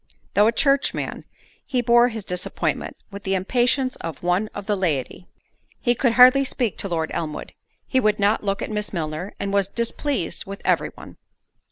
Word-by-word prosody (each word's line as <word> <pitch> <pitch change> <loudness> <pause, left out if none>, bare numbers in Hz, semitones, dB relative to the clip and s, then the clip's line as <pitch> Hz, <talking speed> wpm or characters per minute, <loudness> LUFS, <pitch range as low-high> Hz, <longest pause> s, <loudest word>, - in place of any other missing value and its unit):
Though 205 +1 +5
a - - +4
churchman, 275 +3 0 0.4
he 255 - -1
bore 240 +1 +5
his 220 -4 -6
disappointment 180 0 -3
with 200 0 -7
the 195 0 -1
impatience 250 +7 +1
of 165 0 -7
one 180 +4 +1
of 205 - -6
the 210 - +1
laity: 175 -2 -2 0.5
he 240 - +2
could 240 0 +1
hardly 255 +3 +7
speak 245 -5 -1
to 195 - -3
Lord 160 -2 -1
Elmwood; 155 -2 -4 0.3
he 260 - +1
would 215 -4 +2
not 205 +2 +2
look 195 -1 -1
at - - -5
Miss 210 -1 -2
Milner, 160 +2 -4
and 200 0 -2
was 200 -1 +2
displeased 235 - -2
with 195 0 -8
every - - +2
one. - - -12
205 Hz, 180 wpm, -23 LUFS, 185-240 Hz, 0.5 s, hardly